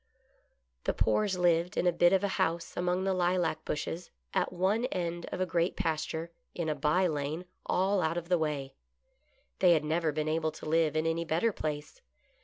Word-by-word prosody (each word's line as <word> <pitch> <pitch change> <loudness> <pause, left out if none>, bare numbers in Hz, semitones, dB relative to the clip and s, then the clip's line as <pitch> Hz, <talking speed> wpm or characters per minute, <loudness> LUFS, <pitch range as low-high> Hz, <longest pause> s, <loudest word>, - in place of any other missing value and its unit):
The - - 0
Poores 190 - +1
lived 175 0 +2
in - - +1
a 180 - +5
bit 175 +1 +4
of 195 +1 +3
a - - +3
house 165 +1 -1
among 180 +1 0
the 195 0 +1
lilac 175 -3 +1
bushes, 165 +3 -3 0.2
at - - +1
one 190 +6 +1
end 175 -6 -3
of - - -4
a 185 - +2
great 170 0 0
pasture, 160 +1 -2 0.2
in 170 -2 -2
a - - +2
by 150 +6 +2
lane, 155 +1 -2 0.2
all 190 +1 +2
out 160 +1 0
of 170 -1 -4
the 180 -1 +2
way. 145 -4 -2 0.9
They 180 -2 +6
had 155 -2 +1
never 160 +1 +1
been 155 +1 -2
able 160 0 0
to - - -10
live 160 0 +2
in 155 +1 +1
any 165 +1 0
better 170 +8 +1
place. 150 - -5
170 Hz, 195 wpm, -30 LUFS, 155-180 Hz, 0.9 s, They